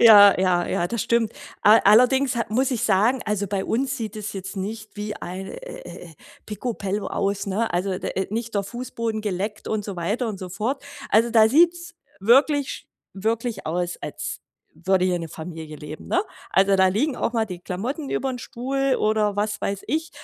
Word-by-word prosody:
Ja, 205 -3 +9
ja, 180 -2 +2
ja, 175 - 0
das 235 +5 -3
stimmt. 235 -1 +1 0.3
All 215 +2 +7
allerdings 250 +5 +5
ha 230 - +1
muss 255 +5 +2
ich 245 -4 -1
sagen 220 +6 +3
also 210 -1 -1
bei 195 0 -2
uns 270 +4 0
sieht 220 -4 -5
es 210 -1 -5
jetzt 190 +1 -6
nicht 215 +3 -5
wie 210 0 -4
ein, 185 +2 -6
äh - - -8 0.3
äh - - -10
äh, - - -17 0.3
picobello 210 -2 -3
aus, 200 +1 -1
ne? 210 +4 -1
Also 185 +1 -1
d - - -4
äh 190 - -1
äh, - - -10
nicht 230 +1 -3
der 200 - +1
Fußboden 230 0 -4
geleckt 210 +1 -3
und 215 -2 -1
so 200 -3 -5
weiter 210 +8 -1
und 205 - -5
so 185 -1 -7
fort. 225 +9 -2 0.3
Also, 230 +3 +4
da 220 -1 +6
sieht's 340 +5 +3 0.3
wirklich 275 +6 +4
sch - - -8 0.3
wirklich 220 +1 -2
aus, 175 +2 -1
als - - -5 0.3
würde 185 +1 +1
hier 180 -1 +1
'ne 165 -1 -6
Familie 160 -1 -8
leben, 150 +1 -9
ne? 370 - +2 0.3
Also, 195 +1 +4
da 190 0 +5
liegen 250 +9 0
auch - - -1
mal 225 -2 +1
die 180 -4 -7
Klamotten 245 - -4
übern 260 -2 -1
Stuhl 265 +3 -1
oder 215 -1 +1
was 210 0 -1
weiß 200 0 -1
ich. 320 +2 -1
210 Hz, 200 wpm, -24 LUFS, 190-240 Hz, 0.3 s, Ja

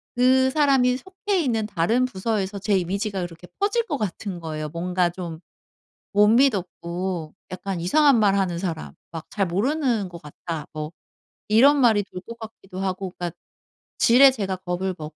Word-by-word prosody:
그 260 +1 +4
사람이 265 -4 +3
속해 380 - -2
있는 230 -8 0
다른 220 +7 +1
부서에서 200 -2 -2
제 200 0 +1
이미지가 195 +2 -2
그렇게 175 0 -8
퍼질 440 +3 +1
것 295 -9 -2
같은 195 -3 -4
거예요, 155 -2 -5
뭔가 175 +2 0
좀 170 -2 -7 0.7
못 205 +1 +5
미덥고 185 - 0 0.2
약간 185 -1 -4
이상한 270 - +4
말 200 -2 +4
하는 185 -3 0
사람. 160 - -4 0.2
막 165 -1 -8
"잘 195 -2 0
모르는 230 - 0
것 170 -1 -10
같다." 150 +1 -7
뭐 155 +1 -5 0.6
이런 265 +7 +6
말이 220 -4 +4
돌 185 - -9
것 235 0 -8
같기도 210 -4 -10
하고 190 -1 -3
그러니까 175 -1 -3 0.7
지레 260 +3 +7
제가 195 -6 -3
겁을 185 +1 -3
먹고 155 0 -8
195 Hz, 315 characters per minute, -24 LUFS, 175-245 Hz, 0.7 s, 지레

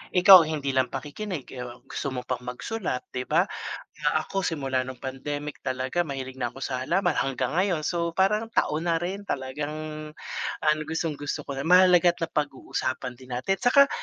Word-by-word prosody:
Ikaw, 180 -3 +9
hindi 145 -3 -1
lang 130 -1 +2
pakikinig, 150 - -5
eh, 125 -1 -6 0.2
gusto 140 - -4
mo 125 -2 -3
pang 125 - -2
magsulat, 145 - -3
‘di 125 0 -4
ba, 165 +4 +4 0.6
na - - +3
ako 195 -1 -3
simula 135 -5 0
nung 130 -1 -8
pandemic 145 +2 -4
talaga 130 +6 0
mahilig 130 -3 -5
na 120 -2 -2
ako 135 - -11
sa 130 -1 -2
halaman 175 0 +1
hanggang 135 +2 -1
ngayon. 185 -4 +2
So, 170 -1 0
parang 210 +5 +1
taon 155 -4 +1
na 165 - +1
rin, 195 +4 -4
talagang 145 -1 -3 0.9
ang 150 0 +4
gustong-gusto 150 -2 -2
ko 135 -1 -5
na 145 - -3
mahalaga 180 -1 +6
at - - -17
napag-uusapan 130 -4 -2
din 130 -1 -6
natin. 195 +10 0
Tsaka 280 +3 +6
150 Hz, 170 wpm, -26 LUFS, 130-175 Hz, 0.9 s, Ikaw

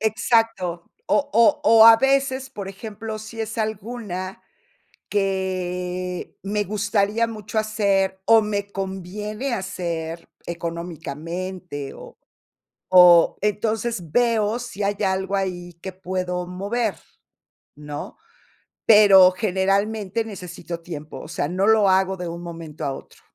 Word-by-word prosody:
Exacto, 220 -5 0 0.2
o - - +3 0.2
o 230 - +8 0.2
o, 225 -1 +8
a 230 0 +10
veces, 270 +1 +1
por 200 -2 -7
ejemplo, 215 +2 -7
si 225 +1 -8
es 220 +1 -4
alguna 215 -3 -4 0.7
que 185 -2 -2
me 205 +1 -1
gustaría 210 +2 0
mucho 215 -1 -3
hacer 200 -3 +1
o 225 -1 +6
me 205 -1 -3
conviene 205 +6 -4
hacer 170 -4 -4 0.2
económicamente 170 -1 -5
o - - -12 0.7
o 180 -2 +7
entonces 210 -3 -1
veo 230 -2 +2
si 235 -4 -7
hay 200 +1 0
algo 190 +1 0
ahí 180 -2 -3
que 190 - -5
puedo 180 -1 -3
mover, 200 +3 -2 0.8
¿no?, 150 0 -8 0.7
pero, 200 -4 +8
generalmente, 200 +3 0
necesito 180 -4 -7
tiempo, 155 -3 -8
o - - -9
sea, - - -2
no 185 +4 0
lo 215 -2 +5
hago 190 0 +2
de 180 - -4
un 170 +1 -6
momento 165 -3 -7
a 140 - -1
otro. - - -13
195 Hz, 120 wpm, -23 LUFS, 180-215 Hz, 0.8 s, a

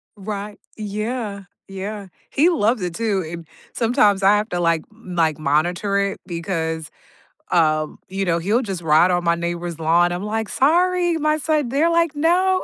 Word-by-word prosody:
Right. 205 0 -6 0.2
Yeah, 210 0 -4 0.2
yeah. 195 +1 -6 0.2
He 320 +6 +4
loves 230 - +1
it 175 -2 -3
too 210 -5 0
and, 170 -1 -8 0.3
sometimes 215 -5 +2
I 200 +2 +6
have 215 +2 -2
to, 175 - -2
like 165 -2 +1
like, 175 -8 -1
monitor 175 +7 0
it 200 0 -1
because, 160 -2 -3 0.6
um, 155 -2 +2
you 195 +1 -2
know, 170 -2 +1
he'll 210 +9 +1
just 190 -6 -5
ride 160 +3 +4
on 175 -1 0
my 170 0 +3
neighbor's 170 -1 -4
lawn. 170 +2 +3
I'm 175 - -3
like, 220 0 -2
"Sorry, 350 +4 +2
my 305 0 +1
son" 300 -4 0
They're 300 +6 +2
like, 335 -2 +2
"No." 370 +4 +2
200 Hz, 165 wpm, -21 LUFS, 170-240 Hz, 0.6 s, I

